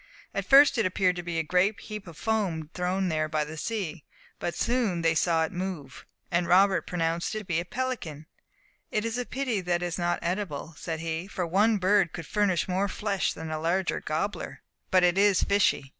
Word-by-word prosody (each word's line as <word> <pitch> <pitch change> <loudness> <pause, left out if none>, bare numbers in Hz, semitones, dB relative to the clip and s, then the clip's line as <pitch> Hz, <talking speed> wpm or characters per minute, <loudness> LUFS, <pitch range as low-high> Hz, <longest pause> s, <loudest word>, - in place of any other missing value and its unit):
At - - -3
first 275 -2 +7
it 225 - +2
appeared 185 -1 +1
to - - -2
be 170 -1 -4
a 165 - +1
great 185 +6 +2
heap 210 -3 -7
of 165 -2 -11
foam 185 -9 -1
thrown 185 +1 0
there 155 -1 0
by 155 -1 0
the 155 +2 -8
sea, 180 -4 -4 0.4
but 175 - -3
soon 230 -9 0
they 165 0 +4
saw 160 0 +2
it - - -7
move, 175 -8 -6 0.2
and 175 0 +1
Robert 190 +2 +4
pronounced 170 +2 -1
it - - -1
to - - -13
be 170 -3 0
a 170 - -4
pelican. 180 - -4 0.6
"It 215 +1 -1
is 230 +2 -2
a 245 - -3
pity 255 -7 -1
that 175 -1 0
it - - 0
is 175 0 -3
not 175 0 +1
eatable," 170 -3 -3
said 160 +3 -5
he, 165 +2 -3
"for 185 -3 -3
one 205 +6 +3
bird 195 -1 +3
would 165 - -6
furnish 200 -3 +1
more 190 +2 0
flesh 200 0 -1
than 160 0 -7
a 155 - -2
larger 175 +3 0
gobbler. 200 +7 -3 0.3
But 185 -1 +4
it 180 +2 +3
is 200 -1 +4
fishy." 200 -8 +2
180 Hz, 210 wpm, -27 LUFS, 165-205 Hz, 0.6 s, first